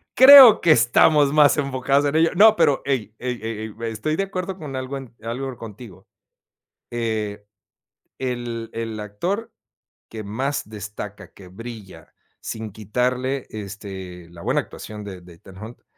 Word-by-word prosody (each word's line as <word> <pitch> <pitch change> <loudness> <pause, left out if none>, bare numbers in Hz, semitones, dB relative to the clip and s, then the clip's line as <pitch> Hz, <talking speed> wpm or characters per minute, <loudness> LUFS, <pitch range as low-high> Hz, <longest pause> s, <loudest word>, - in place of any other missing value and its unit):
Creo 260 -4 +10
que 170 - +4
estamos 140 +3 +4
mas 150 -1 +5
enfocados 140 0 0
en 145 +1 -1
ello. 165 +1 +4
No, 215 +3 +7
pero, 145 -9 +2
ey, 125 -6 -2
ey, 125 -1 -4
ey, 110 -1 -6 0.2
estoy 110 +8 -2
de 195 - +1
acuerdo 190 -1 -5
con 145 -7 -8
algo 130 +1 -4 0.3
algo 125 +2 -5
contigo. 110 -3 -12 0.8
Eh, 110 -3 -3 0.7
el 120 -3 -4
el 115 -1 -5
actor, 180 - -4 0.6
que 110 -1 -7
más 130 +8 -3
destaca, 105 -1 -9
que 95 - -14
brilla, 100 -5 -11 0.3
sin 110 -1 -6
quitarle, 125 +6 -2
este, 95 -4 -9
la 85 -1 -13
buena - - +1
actuación 105 0 -10
de 95 -3 -9
de, 90 0 -15
Ethan 95 +2 -16
Hawke 110 +4 -11
115 Hz, 145 wpm, -22 LUFS, 105-140 Hz, 0.8 s, Creo